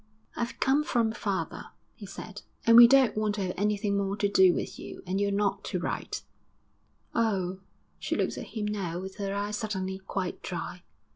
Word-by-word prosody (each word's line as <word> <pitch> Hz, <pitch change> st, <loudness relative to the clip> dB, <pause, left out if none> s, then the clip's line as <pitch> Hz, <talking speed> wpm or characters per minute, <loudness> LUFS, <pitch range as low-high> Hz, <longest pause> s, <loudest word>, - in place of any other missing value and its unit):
'I've 235 Hz, 0 st, -3 dB
come 275 Hz, +3 st, +3 dB
from 230 Hz, -6 st, +1 dB
father,' 195 Hz, -7 st, -3 dB, 0.3 s
he 205 Hz, -, -10 dB
said, 205 Hz, +2 st, -8 dB, 0.2 s
'and 230 Hz, -, +7 dB
we 235 Hz, 0 st, +12 dB
don't 265 Hz, -1 st, +5 dB
want 215 Hz, -1 st, 0 dB
to 200 Hz, -, -2 dB
have 180 Hz, -1 st, -2 dB
anything 205 Hz, 0 st, 0 dB
more 200 Hz, 0 st, -1 dB
to 205 Hz, -, +2 dB
do 190 Hz, -2 st, +6 dB
with -, -, -4 dB
you, -, -, -9 dB
and 190 Hz, +2 st, -1 dB
you're 200 Hz, -, +2 dB
not 200 Hz, 0 st, 0 dB
to -, -, -2 dB
write.' -, -, -3 dB, 0.9 s
'Oh!' 190 Hz, -5 st, 0 dB, 0.4 s
She -, -, -2 dB
looked -, -, 0 dB
at -, -, -6 dB
him 210 Hz, -, -1 dB
now 190 Hz, -5 st, -2 dB
with 190 Hz, +1 st, -7 dB
her 200 Hz, -1 st, -2 dB
eyes 205 Hz, +1 st, -2 dB
suddenly 190 Hz, -4 st, -3 dB
quite 190 Hz, -1 st, -4 dB
dry. 180 Hz, 0 st, -5 dB
200 Hz, 190 wpm, -28 LUFS, 190-215 Hz, 0.9 s, we